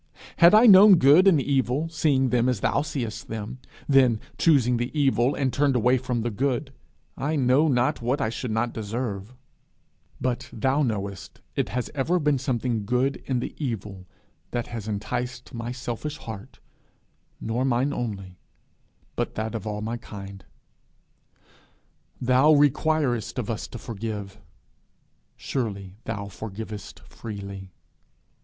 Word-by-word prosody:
Had 170 +4 +7
I 220 +3 +7
known 200 -2 +9
good 160 +5 +6
and 175 -6 +6
evil, 135 +2 0
seeing 145 -5 +2
them 125 0 +2
as 120 -6 -1
thou - - +2
seest 125 -7 -4
them, 110 +3 -6 0.3
then 130 -5 +4 0.2
chosen 125 -7 +4
the 120 +1 -2
evil, 135 -2 +2
and 130 -3 0
turned 140 -2 +2
away 125 +2 +3
from 125 -2 -2
the 120 - -1
good, 135 +4 -1 0.4
I 150 +3 -2
know 135 +3 +3
not 125 -4 +1
what 125 +4 0
I 110 - 0
should 115 +2 -4
not 110 +2 -1
deserve; 110 0 -4 0.8
but 125 -1 -2
thou 130 +5 +1
knowest 100 - -3
it - - 0
has 125 -1 -3
ever 155 +6 +1
been 150 -4 +1
something 120 -4 -1
good 125 +5 0
in 125 -3 0
the - - -5
evil 105 -7 -5 0.4
that 120 -1 -2
has 115 -3 -7
enticed 125 +4 -4
my 115 0 -4
selfish 125 +4 -5
heart 110 -4 -9 0.8
nor 115 +3 -2
mine 135 +2 +1
only, 95 -8 -5 0.8
but - - -2
that 110 +1 -3
of 110 -2 -5
all 105 0 -3
my 115 +2 -3
kind. 100 -4 -10 1.8
Thou 130 +5 +4
requirest 145 -4 +2
of 120 -3 -2
us 110 - -4
to - - -8
forgive: 105 -3 -6 1.0
surely 100 -7 -4
thou 105 -3 -4
forgivest 105 +2 -8
freely! 100 -3 -8
120 Hz, 140 wpm, -25 LUFS, 110-135 Hz, 1.8 s, known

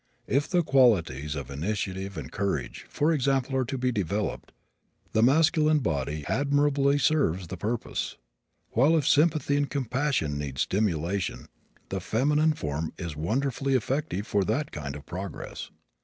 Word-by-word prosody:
If 140 +2 0
the 175 -2 +2
qualities 85 - +3
of 70 -3 -6
initiative 95 +4 -3
and 70 -5 -6
courage, 85 -11 -3
for 155 +3 +1
example, 135 -2 +1
are 130 -1 +1
to 135 - -3
be 125 0 +1
developed, 100 -1 -2 0.6
the 110 - +3
masculine 155 +4 +4
body 75 - -2
admirably 145 0 +2
serves 95 - +1
the 95 - -4
purpose, 110 +6 -3 0.5
while 145 +8 +4
if 145 - 0
sympathy 150 -1 +3
and 145 -1 0
compassion 130 - -1
need 70 -2 -5
stimulation 95 -1 -1 0.4
the 95 - -2
feminine 150 - +2
form 75 - -3
is 85 -4 -5
wonderfully 135 - 0
effective 130 - -1
for 100 -3 +1
that 145 - -1
kind 70 -2 -5
of 70 -1 -10
progress. 95 +3 -6
110 Hz, 140 wpm, -27 LUFS, 85-140 Hz, 0.6 s, masculine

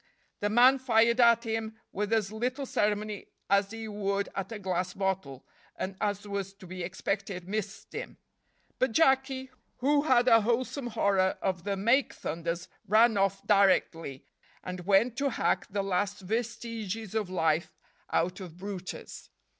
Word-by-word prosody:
The 205 - 0
man 250 +5 +6
fired 235 -1 +3
at 235 -1 +6
him 225 -1 -3
with 210 +2 -2
as 215 -3 +1
little 250 +5 -2
ceremony 210 -3 -1 0.2
as 200 0 +4
he 225 0 -6
would 200 -1 -1
at 195 +2 -4
a 225 - -4
glass 185 -2 -2
bottle, 190 -9 -2 0.3
and, 190 +1 -4
as 205 -1 -1
was 200 -1 -4
to 195 -1 -14
be 185 +1 -7
expected, 185 +1 -3
missed 210 0 -5
him; - - -6 0.6
but 255 -3 +1
Jacky, 265 -3 +2 0.3
who 285 +3 +3
had 255 -4 +3
a 225 -2 +7
wholesome 245 +4 -1
horror 200 -4 +1
of 180 -3 -1
the 200 -1 -1
make 235 +8 +2
thunders, 170 +1 -4 0.2
ran 220 +2 +5
off 195 0 +1
directly, 180 -8 +2 0.4
and 180 -1 -6
went 215 +5 +4
to 280 +1 +1
hack - - 0
the 200 0 -1
last 195 +2 -1
vestiges 225 0 -4
of 215 -4 -1
life 160 -2 +1 0.4
out 180 +3 0
of 175 -3 -9
brutus. 190 -1 -7
205 Hz, 155 wpm, -29 LUFS, 190-230 Hz, 0.6 s, a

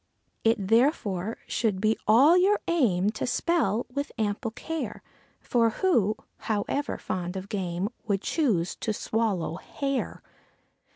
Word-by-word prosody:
It 225 +1 +4
therefore 225 - +2
should 210 -5 0
be 215 +2 +2
all 265 +10 +7
your 385 +3 +4
aim 210 - +2
to 215 - -3
spell 245 - +1
with 285 +1 -3
ample 215 +2 -1
care; 325 +8 -5 0.4
For 230 -2 +2
who, 225 - +2 0.2
however 225 +7 -2
fond 180 0 -4
of 190 +1 -7
game, 185 -2 -2 0.2
would 200 -2 0
choose 210 - +1
to 215 - -2
swallow 205 -7 -1
hair? 275 +3 -3
225 Hz, 125 wpm, -27 LUFS, 195-275 Hz, 0.4 s, all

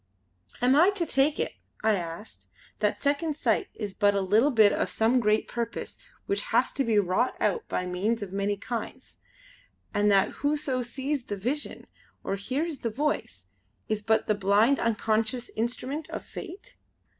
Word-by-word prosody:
"Am 255 +2 +5
I 340 +6 +6
to 350 -4 0
take 290 0 +2
it" - - -1 0.3
I 220 0 +4
asked, 175 +2 -6 0.3
"that - - +1
Second 290 +2 0
Sight 380 - +1
is 205 -3 -5
but 205 0 +3
a 200 - +2
little 215 +9 +4
bit 220 -6 +5
of - - 0
some 230 +3 +2
great 215 -1 +2
purpose 235 -1 -4 0.3
which 400 - 0
has - - +1
to 275 - 0
be 225 -4 +2
wrought 200 +5 +2
out 460 -3 0
by 180 - -2
means 205 +5 -1
of 190 -2 -8
many 200 +1 0
kinds; 235 +4 -6 0.7
and 205 0 +3
that 195 -1 +4
whoso 285 -3 0
sees 265 +2 -3
the 205 - -4
Vision 255 +10 -3 0.4
or 195 - -1
hears 275 - -3
the 230 - -2
Voice 220 - -2 0.4
is 215 -1 0
but 220 +1 +2
the 215 - +2
blind 205 +6 +3
unconscious 225 +1 0
instrument 250 +7 -3
of - - -6
Fate?" 395 +7 -9
230 Hz, 170 wpm, -27 LUFS, 205-280 Hz, 0.7 s, I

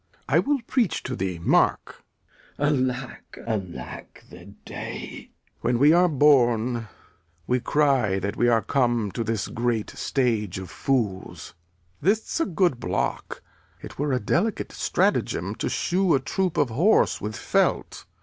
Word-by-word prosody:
I - - +3
will 290 -1 +1
preach 240 -7 0
to 130 - -4
thee. 95 -3 -3
Mark. 85 - +1 0.5
Glou. 145 -3 +2
Alack, 125 0 -9
alack 100 -6 -6
the - - -12 0.2
day! - - -6
Lear. - - -11 0.3
When 125 - 0
we 145 +5 +6
are 180 +1 +5
born, 120 -5 +3 0.6
we 125 +5 +1
cry 130 -6 +2
that 100 +3 -3
we 120 - +2
are 115 -3 +3
come 120 -4 +1
To 115 - -3
this 110 -2 -2
great 120 -2 -2
stage 115 -9 -1
of 95 -2 -7
fools. 110 -9 -2 0.5
This' 215 - 0
a 330 - +1
good 175 -7 +1
block. 90 -3 -3 0.4
It - - -11
were 145 0 0
a 130 - +1
delicate 185 - -1
stratagem - - 0
to - - -2
shoe 185 -1 +1
A - - +2
troop 180 +6 -2
of 145 -4 +2
horse 175 - +3
with 105 +1 -4
felt. - - 0
125 Hz, 150 wpm, -25 LUFS, 110-150 Hz, 0.6 s, we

